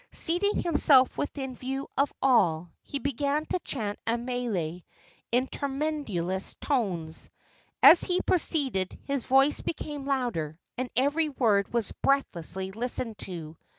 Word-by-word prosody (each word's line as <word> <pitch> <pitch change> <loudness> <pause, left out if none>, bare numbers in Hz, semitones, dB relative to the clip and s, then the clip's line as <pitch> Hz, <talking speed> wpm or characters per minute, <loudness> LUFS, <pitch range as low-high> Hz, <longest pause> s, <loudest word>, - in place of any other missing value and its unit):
Seating 370 +5 0
himself 290 -5 +5
within 270 -2 -3
view 265 +2 -4
of 280 +1 +2
all, 175 -11 +3
he 280 - -5
began 280 +2 -1
to 365 - -1
chant 215 -11 -4
a 230 +1 +2
mele 235 -9 -2 0.5
in 250 +2 +3
tremulous 270 - -2
tones. 180 - -2 0.5
As 335 - +9
he 360 0 +1
proceeded 270 - 0
his 280 -3 -2
voice 270 +3 +4
became 295 -3 -5
louder, 235 - -1 0.2
and 255 0 -3
every 290 +5 +2
word 215 -8 +2
was 235 -4 -1
breathlessly 190 - -1
listened 230 0 -3
to. 165 -4 -6
255 Hz, 125 wpm, -28 LUFS, 195-280 Hz, 0.5 s, As